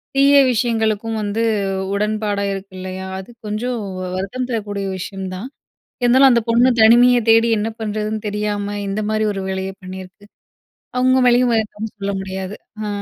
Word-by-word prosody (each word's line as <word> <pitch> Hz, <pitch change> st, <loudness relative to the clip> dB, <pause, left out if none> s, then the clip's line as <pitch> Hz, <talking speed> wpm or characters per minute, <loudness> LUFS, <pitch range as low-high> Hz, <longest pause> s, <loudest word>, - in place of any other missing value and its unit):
தீய 275 Hz, +1 st, +5 dB, 0.2 s
விஷயங்களுக்கும் 225 Hz, -2 st, 0 dB
வந்து 210 Hz, +2 st, -1 dB, 0.5 s
உடன்பாடா 210 Hz, 0 st, -1 dB
இருக்கு 195 Hz, 0 st, -8 dB
இல்லையா? 185 Hz, 0 st, -6 dB
அது 190 Hz, -, -10 dB, 0.2 s
கொஞ்சம் 240 Hz, +4 st, -2 dB, 0.4 s
வருத்தம் 200 Hz, +7 st, -3 dB
தரக்கூடிய 205 Hz, -4 st, -3 dB
விஷயம் 190 Hz, +1 st, -6 dB
தான். 195 Hz, +7 st, -6 dB, 0.6 s
இருந்தாலும் 260 Hz, +3 st, +6 dB
அந்த 235 Hz, -, +3 dB
பொண்ணு 240 Hz, +2 st, +5 dB
தனிமைய 245 Hz, +3 st, +7 dB
தேடி 225 Hz, +1 st, +5 dB
என்ன 210 Hz, +2 st, -1 dB
பண்ணுறதுன்னு 215 Hz, 0 st, -3 dB
தெரியாம. 205 Hz, 0 st, -2 dB
இந்த 195 Hz, +2 st, -2 dB
மாரி 215 Hz, 0 st, 0 dB
ஒரு 195 Hz, -, -4 dB
வேலைய 190 Hz, 0 st, -3 dB
பண்ணியிருக்கு. 185 Hz, +2 st, -10 dB, 0.7 s
அவுங்க 255 Hz, +1 st, +3 dB
மேலயும் 245 Hz, 0 st, +4 dB, 0.4 s
சொல்ல 200 Hz, 0 st, -2 dB
முடியாது 190 Hz, +1 st, -5 dB, 0.3 s
ஆ. -, -, -3 dB
210 Hz, 140 wpm, -19 LUFS, 195-235 Hz, 0.7 s, தனிமைய